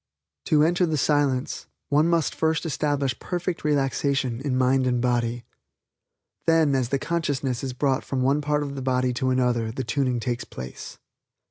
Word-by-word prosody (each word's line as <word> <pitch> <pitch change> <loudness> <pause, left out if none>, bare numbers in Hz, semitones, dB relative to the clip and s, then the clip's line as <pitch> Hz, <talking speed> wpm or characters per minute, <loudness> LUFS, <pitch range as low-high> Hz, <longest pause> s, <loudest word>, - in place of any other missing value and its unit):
To 150 -1 +4
enter 175 +2 +2
the 155 -1 0
Silence 140 -3 0 0.2
one 150 +3 +3
must 170 -3 +1
first 160 +1 0
establish 145 -3 -1
perfect 175 -1 -3
relaxation 135 -3 0
in 135 -3 0
mind 130 0 +3
and 125 -1 +1
body. 120 -1 0 1.0
Then 165 -3 +4
as 130 -3 0
the 140 - +1
consciousness 140 -5 -2
is 130 -2 -3
brought 130 +1 0
from 130 -2 -2
one 140 +3 +2
part 150 0 0
of 140 -1 -5
the 135 - -5
body 130 -1 +1
to 130 +1 0
another 125 -3 +1
the 130 +3 -4
tuning 125 +1 0
takes 120 0 -2
place. 65 0 -9
135 Hz, 165 wpm, -25 LUFS, 125-150 Hz, 1.0 s, To